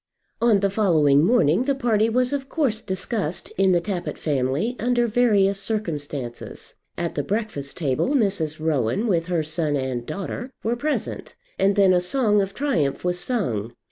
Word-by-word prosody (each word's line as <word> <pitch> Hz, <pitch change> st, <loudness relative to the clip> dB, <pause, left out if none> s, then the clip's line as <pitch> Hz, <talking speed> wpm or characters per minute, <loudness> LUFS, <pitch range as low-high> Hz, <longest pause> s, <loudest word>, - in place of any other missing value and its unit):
On 225 Hz, -4 st, +4 dB
the 200 Hz, -, +2 dB
following 155 Hz, -9 st, +3 dB
morning 190 Hz, -, +3 dB
the 280 Hz, 0 st, +1 dB
party 225 Hz, -4 st, +2 dB
was 250 Hz, +3 st, +1 dB
of 275 Hz, -1 st, -3 dB
course 260 Hz, -9 st, 0 dB
discussed 190 Hz, -3 st, -3 dB
in 190 Hz, 0 st, +3 dB
the 175 Hz, -, +4 dB
Tappitt 180 Hz, 0 st, -4 dB
family 145 Hz, -, -1 dB
under 240 Hz, +1 st, +2 dB
various 210 Hz, -4 st, +3 dB
circumstances. 150 Hz, -, -4 dB, 0.2 s
At 170 Hz, -, -2 dB
the 145 Hz, -, -1 dB
breakfast 195 Hz, -7 st, -3 dB
table 155 Hz, -, 0 dB
Mrs. 190 Hz, -, 0 dB
Rowan, 155 Hz, -, 0 dB
with 170 Hz, -6 st, +1 dB
her 170 Hz, -3 st, 0 dB
son 155 Hz, -1 st, -1 dB
and 130 Hz, -3 st, -2 dB
daughter, 200 Hz, -, -5 dB
were 230 Hz, +2 st, 0 dB
present; 300 Hz, +5 st, -3 dB, 0.2 s
and 195 Hz, +1 st, +3 dB
then 195 Hz, -2 st, +5 dB
a 180 Hz, -, +3 dB
song 210 Hz, +1 st, +2 dB
of 195 Hz, 0 st, -4 dB
triumph 170 Hz, -, 0 dB
was 180 Hz, 0 st, -1 dB
sung. 120 Hz, -, -2 dB
195 Hz, 165 wpm, -23 LUFS, 155-230 Hz, 0.2 s, then